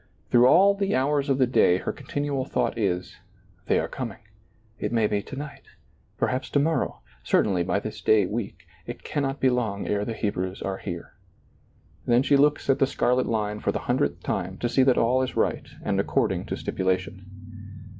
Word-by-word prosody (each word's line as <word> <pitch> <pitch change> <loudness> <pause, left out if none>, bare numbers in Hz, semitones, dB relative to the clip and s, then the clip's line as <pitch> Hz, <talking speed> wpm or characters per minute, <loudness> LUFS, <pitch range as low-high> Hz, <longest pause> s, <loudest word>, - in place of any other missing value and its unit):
Through 120 +1 +6
all 195 +8 +6
the 200 0 -1
hours 140 +2 +1
of 135 - +2
the 130 - +4
day 105 -7 +4
her - - -3
continual 145 -2 -3
thought - - -1
is: 95 -5 -2 0.5
They - - +3
are - - 0
coming, - - -5 0.6
it - - -2
may 115 -2 +2
be 105 -1 0
to 135 - -9
night, 140 0 -7 0.6
perhaps 130 +1 -1
to 145 - +2
morrow, 160 +3 0 0.2
certainly 90 - +2
by 95 +3 0
this 110 +1 -7
day 110 -3 +4
week; 110 +3 -5 0.2
it - - -7
can 145 - -2
not 135 0 -2
be 130 - +3
long 110 -5 -1
ere 105 0 0
the 115 - -3
Hebrews 95 -3 -3
are 95 -1 -3
here. 85 -4 -7 0.9
Then 120 +2 +4
she 140 - +3
looks 145 +1 +3
at 135 0 +3
the 135 - +4
scarlet 125 -1 +1
line 105 -2 -1
for - - 0
the - - -2
hundredth - - 0
time 95 +2 -3
to 120 - -1
see 135 - +3
that 130 -1 +4
all 125 +3 +3
is 130 - -3
right - - 0 0.2
and - - 0
according - - 0
to - - -2
stipula 95 0 0
tion. 95 +3 -12
120 Hz, 195 wpm, -25 LUFS, 100-135 Hz, 0.9 s, Through